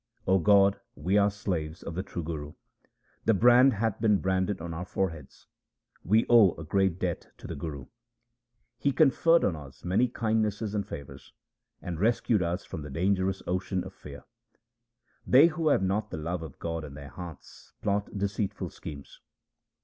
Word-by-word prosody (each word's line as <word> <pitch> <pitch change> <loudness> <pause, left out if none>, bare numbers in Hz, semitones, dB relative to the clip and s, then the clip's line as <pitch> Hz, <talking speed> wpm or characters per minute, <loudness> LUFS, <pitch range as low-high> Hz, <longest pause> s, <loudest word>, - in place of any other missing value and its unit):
O 95 0 +4
God, 100 +1 +4 0.2
we 90 +7 -1
are 100 0 +5
slaves 85 -5 -4
of 85 - -6
the 90 - -2
true 85 -2 -6
Guru: 75 -2 -5 0.7
The 115 - +4
brand 125 +5 +6
hath 110 0 -1
been 105 -3 +4
branded 95 +1 0
on 85 0 -6
our 85 +2 -4
foreheads; 80 -6 -4 0.6
we 110 +6 +3
owe 115 -7 +6
a 85 - -8
great 95 +2 +1
debt 90 -3 -3
to - - -14
the - - -5
Guru: 70 -3 -6 0.9
He 140 - +1
conferred 165 +4 +4
on 90 - +1
us 70 -3 -12
many 95 +8 +2
kindnesses 110 -3 -1
and 105 -2 -2
favours, 70 -2 -9 0.5
and 85 -2 -5
rescued 110 0 +2
us 90 +2 -2
from 80 - -7
the 75 - -7
dangerous 95 +5 0
ocean 95 +1 -1
of - - -9
fear. - - -11 1.0
They 135 +5 +7
who 165 -1 0
have 140 - +3
not 105 +3 0
the - - -5
love 85 +3 -3
of 80 -4 -9
God 80 -1 -4
in 70 -2 -9
their 70 -1 -9
hearts 85 -4 -11
plot 100 0 0
deceitful 100 0 -2
schemes. 70 -2 -10
95 Hz, 170 wpm, -28 LUFS, 80-105 Hz, 1.0 s, They